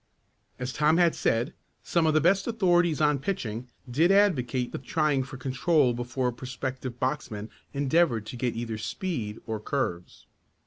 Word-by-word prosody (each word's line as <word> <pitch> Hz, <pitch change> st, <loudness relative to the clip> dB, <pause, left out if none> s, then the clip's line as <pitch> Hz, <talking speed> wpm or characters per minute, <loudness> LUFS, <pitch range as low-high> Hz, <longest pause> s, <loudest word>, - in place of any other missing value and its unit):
As 125 Hz, +1 st, -4 dB
Tom 155 Hz, +2 st, +3 dB
had 175 Hz, -2 st, +4 dB
said, 120 Hz, +8 st, 0 dB, 0.3 s
some 170 Hz, -2 st, +2 dB
of 155 Hz, -, +2 dB
the 155 Hz, -, +5 dB
best 195 Hz, +5 st, +3 dB
authorities 175 Hz, -8 st, +2 dB
on 150 Hz, -2 st, +3 dB
pitching 125 Hz, -, -3 dB, 0.2 s
did 155 Hz, +9 st, +3 dB
advocate 135 Hz, -12 st, +2 dB
the -, -, -4 dB
trying 140 Hz, +2 st, +1 dB
for 130 Hz, +1 st, -7 dB
control 135 Hz, +1 st, +2 dB
before 120 Hz, +1 st, -1 dB
a -, -, -5 dB
prospective 130 Hz, 0 st, -5 dB
boxman 115 Hz, -5 st, -2 dB, 0.2 s
endeavored 140 Hz, -5 st, +2 dB
to 120 Hz, -, -7 dB
get 120 Hz, -1 st, -1 dB
either 115 Hz, -2 st, -4 dB
speed 115 Hz, -, -3 dB
or 110 Hz, -1 st, -3 dB
curves. 105 Hz, -8 st, -3 dB
130 Hz, 155 wpm, -27 LUFS, 120-160 Hz, 0.3 s, the